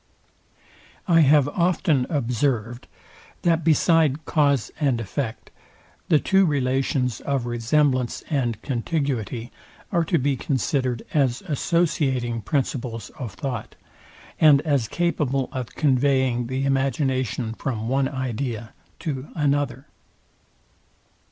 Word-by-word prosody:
I 170 Hz, -2 st, +5 dB
have 145 Hz, -2 st, +5 dB
often 165 Hz, -5 st, +1 dB
observed, 120 Hz, -3 st, -1 dB, 0.6 s
that, 165 Hz, -1 st, +2 dB
beside 155 Hz, -2 st, +3 dB
cause 140 Hz, -6 st, +2 dB
and 135 Hz, -6 st, +1 dB
effect, 115 Hz, +1 st, -4 dB, 0.6 s
the 155 Hz, -, +6 dB
two 190 Hz, +6 st, +3 dB
relations 130 Hz, -, 0 dB
of 135 Hz, -3 st, -1 dB
resemblance 125 Hz, +2 st, +1 dB
and 120 Hz, -8 st, -1 dB
contiguity, 125 Hz, -, -2 dB, 0.4 s
are 170 Hz, -, +2 dB
to 170 Hz, +1 st, +2 dB
be 140 Hz, 0 st, +1 dB
considered 130 Hz, -3 st, -1 dB
as 135 Hz, -2 st, +1 dB
associating 140 Hz, -8 st, 0 dB
principles 120 Hz, -, -2 dB
of 120 Hz, -7 st, -7 dB
thought, 125 Hz, -5 st, -5 dB, 0.6 s
and 150 Hz, -3 st, +6 dB
as 140 Hz, -7 st, 0 dB
capable 140 Hz, -4 st, 0 dB
of 130 Hz, -2 st, -6 dB
conveying 130 Hz, -4 st, +2 dB
the 130 Hz, +2 st, -2 dB
imagination 130 Hz, -4 st, 0 dB
from 115 Hz, -2 st, -4 dB
one 135 Hz, +1 st, +1 dB
idea 125 Hz, -4 st, -4 dB, 0.3 s
to 140 Hz, -3 st, -4 dB
another. 145 Hz, -4 st, 0 dB
135 Hz, 105 wpm, -24 LUFS, 120-145 Hz, 0.6 s, the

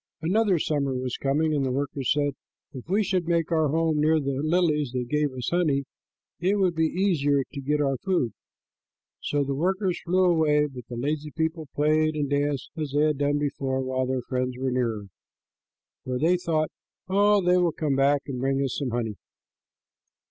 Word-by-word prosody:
Another 195 Hz, +2 st, +2 dB
summer 140 Hz, -4 st, -1 dB
was 125 Hz, -1 st, -3 dB
coming, 155 Hz, +3 st, +1 dB
and 145 Hz, -2 st, +1 dB
the 130 Hz, -, 0 dB
workers 135 Hz, 0 st, -1 dB
said, 145 Hz, -1 st, +1 dB, 0.4 s
"If 130 Hz, +3 st, -9 dB
we 205 Hz, +3 st, +2 dB
should 185 Hz, -3 st, -1 dB
make 170 Hz, -1 st, +1 dB
our 160 Hz, -2 st, +3 dB
home 160 Hz, +1 st, +1 dB
near 155 Hz, +1 st, +3 dB
the 140 Hz, -1 st, -2 dB
lilies 155 Hz, -5 st, +1 dB
that 125 Hz, -1 st, -3 dB
give 150 Hz, 0 st, +1 dB
us 125 Hz, -2 st, -4 dB
honey, 155 Hz, -6 st, +2 dB, 0.6 s
it 185 Hz, +4 st, +2 dB
would 185 Hz, -3 st, +2 dB
be 160 Hz, -1 st, +2 dB
easier 150 Hz, -7 st, +1 dB
to 140 Hz, -, -5 dB
get 150 Hz, +2 st, 0 dB
our 135 Hz, -2 st, +1 dB
food." 175 Hz, -, 0 dB, 0.9 s
So 145 Hz, -1 st, 0 dB
the 140 Hz, 0 st, -2 dB
workers 185 Hz, +4 st, 0 dB
flew 185 Hz, +2 st, +2 dB
away, 155 Hz, -4 st, +3 dB
but 125 Hz, -5 st, -9 dB
the 120 Hz, -, -6 dB
lazy 150 Hz, +4 st, -2 dB
people 160 Hz, +1 st, -2 dB
played 155 Hz, +1 st, +2 dB
and 145 Hz, -2 st, -1 dB
danced 145 Hz, -1 st, -1 dB
as 155 Hz, -4 st, -4 dB
they 145 Hz, +1 st, +3 dB
had 150 Hz, -2 st, +1 dB
done 145 Hz, 0 st, +1 dB
before 135 Hz, -2 st, -1 dB
while 130 Hz, 0 st, -1 dB
their 130 Hz, -1 st, -1 dB
friends 125 Hz, 0 st, -2 dB
were 130 Hz, 0 st, -1 dB
near, 115 Hz, -5 st, -1 dB, 1.0 s
for 125 Hz, -1 st, -2 dB
they 165 Hz, +7 st, +3 dB
thought, 160 Hz, -3 st, -1 dB, 0.4 s
"Oh, 205 Hz, +2 st, +4 dB
they 180 Hz, -1 st, +3 dB
will 175 Hz, -2 st, +3 dB
come 150 Hz, -2 st, -1 dB
back 140 Hz, +1 st, +3 dB
and 130 Hz, -3 st, -5 dB
bring 135 Hz, +1 st, 0 dB
us 135 Hz, -, -2 dB
some 140 Hz, -3 st, -2 dB
honey." 115 Hz, -3 st, -3 dB
150 Hz, 190 wpm, -26 LUFS, 135-165 Hz, 1.0 s, Oh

